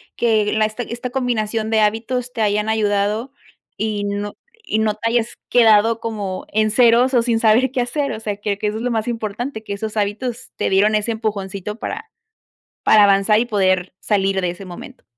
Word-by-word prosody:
que 220 -3 +2
en 220 - 0
la 215 - +4
esta 215 +3 -4
esta 240 +2 -5
combinación 225 -4 -1
de 220 - +3
hábitos 230 +4 0
te 230 - -4
hayan 210 +1 +1
ayudado 210 +3 0 0.4
y 215 -2 -2
no 205 0 -3 0.3
y 215 - 0
no 220 -1 +1
te 230 +2 -2
hayas 235 -1 0
quedado 225 -1 +5
como 205 -5 -4
en 215 0 +2
ceros 245 +2 +4
o 245 - +4
sin 230 -1 +1
saber 235 +4 +4
qué 250 - +1
hacer, 280 +3 -2
o 215 - -6
sea, 205 -2 -3
que 205 -1 -2
que 210 - -2
eso 210 +1 -2
es 225 - -5
lo 250 - 0
más 225 +1 -1
importante, 225 +2 -4
que 200 - -5
esos 215 +1 -5
hábitos 225 +4 -3
te - - -1
dieron 205 +3 +3
ese 210 +2 0
empujoncito 205 -2 -4
para 450 +1 -5 0.7
para 215 -1 +6
avanzar 200 +2 +4
y 240 - +1
poder 185 -5 +1
salir 195 -2 +1
de 180 - 0
ese 175 +3 -8
momento. 175 -1 -11
215 Hz, 200 wpm, -20 LUFS, 205-235 Hz, 0.7 s, para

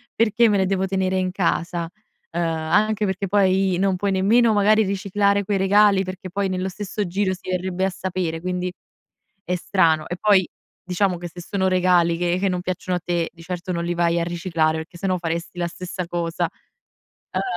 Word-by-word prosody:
Perché 230 +1 +3
me 205 -2 +3
le 190 - +2
devo 190 0 0
tenere 190 0 0
in 185 -1 0
casa?" 170 -2 -1 0.5
Uhm, 175 - 0
anche 180 +7 +1
perché 190 0 -2
poi 190 -2 +2
non 195 -1 +2
puoi 200 +2 -1
nemmeno 220 +4 +4
magari 215 +1 +4
riciclare 200 +1 +1
quei 200 0 0
regali, 195 0 +4
perché 185 0 -7
poi 200 0 -1
nello 185 0 -2
stesso 205 +2 -4
giro 190 +2 0
si 185 - -9
verrebbe 185 +1 -1
a - - +1
sapere, 180 -3 -3
quindi 180 0 -2 0.7
è 180 - -2
strano. 165 -4 +2
E 175 - -3
poi 200 -3 +4 0.4
diciamo 180 0 0
che 175 0 -6
se 175 - -12
sono 190 +2 -1
regali 180 -2 +3
che 175 0 0
che 195 0 +1
non 180 -1 -1
piacciono 180 0 -2
a 180 - -8
te, 175 -2 -1
di 165 - -15
certo 180 +1 -5
non 170 -1 -2
li 175 - -1
vai 170 0 +1
a 170 - 0
riciclare 165 -2 0
perché 160 +2 -8
sennò 185 0 0
faresti 170 +1 -4
la 175 - 0
stessa 180 0 -6
cosa. 170 -1 -2 0.8
Uhm, - - 0
185 Hz, 195 wpm, -22 LUFS, 175-195 Hz, 0.8 s, nemmeno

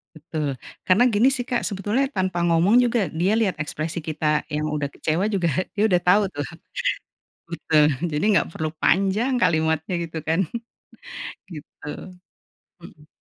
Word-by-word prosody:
Betul, 155 -1 -4 0.4
karena 190 +6 +5
gini 215 +5 +4
sih 260 -2 -2
Kak 245 -1 -1
sebetulnya 210 +6 0
tanpa 185 -7 -1
ngomong 175 +8 +4
juga 240 0 +1
dia 175 +6 +1
lihat 215 -5 +1
ekspresi 155 +3 -4
kita 150 -1 0
yang 150 0 -2
udah 150 -2 -2
kecewa 160 +6 -1
juga 185 -5 +1 0.3
dia 210 - +1
udah 180 -2 +3
tahu 180 +4 +5
tuh. 145 -1 -3 1.0
Betul 160 -2 +2 0.3
jadi 150 +3 -1
nggak - - +2
perlu 155 0 -2
panjang 200 +7 +2
kalimatnya 160 +1 +1
gitu 165 -1 -5
kan, 165 +3 +2 1.1
gitu, 150 -1 -10 0.9
mhm. 155 -3 -15
170 Hz, 140 wpm, -23 LUFS, 155-200 Hz, 1.1 s, karena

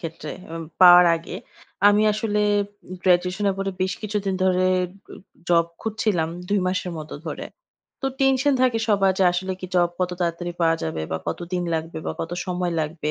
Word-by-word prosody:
ক্ষেত্রে 160 -2 -6 0.2
উব 165 - -5 0.2
পাওয়ার 180 0 +10
আগে 165 - -8 0.5
আমি 205 +1 +4
আসলে 210 0 -1 0.6
গ্র্যাজুয়েশন 180 +2 +2
এর - - -2
পরে 195 0 -1
বেশ 185 +1 +1
কিছুদিন 205 -2 -2
ধরে 185 0 +3 0.5
উ - - -8 0.3
জব 170 -1 +4
খুঁজছিলাম 215 -7 -1 0.2
২ 205 0 +2
মাসের 185 -1 -2
মত 155 0 -8 0.2
ধরে। 155 - -5 0.6
তো - - 0
টেনশন 270 +1 +3
থাকে 250 -3 +3
সবার 195 -2 +3
যে 190 - +4
আসলে 185 +2 -2
কি 185 - -5
জব 175 -1 +4
কত 180 0 +1
তাড়াতাড়ি 175 0 -2
পাওয়া 165 -1 +3
যাবে 80 0 -3
বা 80 - -1
কতদিন 175 +1 -3
লাগবে 160 0 -4
বা - - -1
কত 165 - -4 0.2
সময় 180 -1 -1
লাগবে? 155 0 -3
180 Hz, 175 wpm, -23 LUFS, 170-200 Hz, 0.6 s, পাওয়ার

